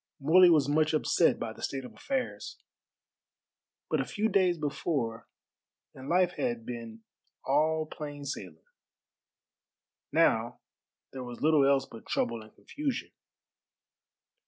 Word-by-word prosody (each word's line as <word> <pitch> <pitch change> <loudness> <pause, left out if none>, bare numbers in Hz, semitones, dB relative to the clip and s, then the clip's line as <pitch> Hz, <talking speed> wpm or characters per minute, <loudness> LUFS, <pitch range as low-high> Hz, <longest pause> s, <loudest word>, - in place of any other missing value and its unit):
Morley 175 +6 +6
was 155 -5 +4
much 155 +2 +2
upset 165 +2 +3
by 115 -1 -4
the - - -14
state 135 -2 -3
of - - -11
affairs. 265 -2 -4 1.3
But - - +1
a - - -3
few 215 +2 -1
days 185 -3 +3
before 140 -6 -2 0.7
and 130 +1 -9
life 180 0 +3
had 235 -2 -2
been 115 -2 -7 0.4
all 155 +4 +2
plain 145 -2 -8
sailing, 90 - -7 1.5
now - - +2 0.5
there 130 -1 -6
was 120 -1 -8
little 150 -3 +5
else 135 -1 +3
but 115 - -13
trouble 115 -1 -1
and 110 0 -14
confusion. 285 -4 -4
145 Hz, 125 wpm, -29 LUFS, 125-175 Hz, 1.5 s, Morley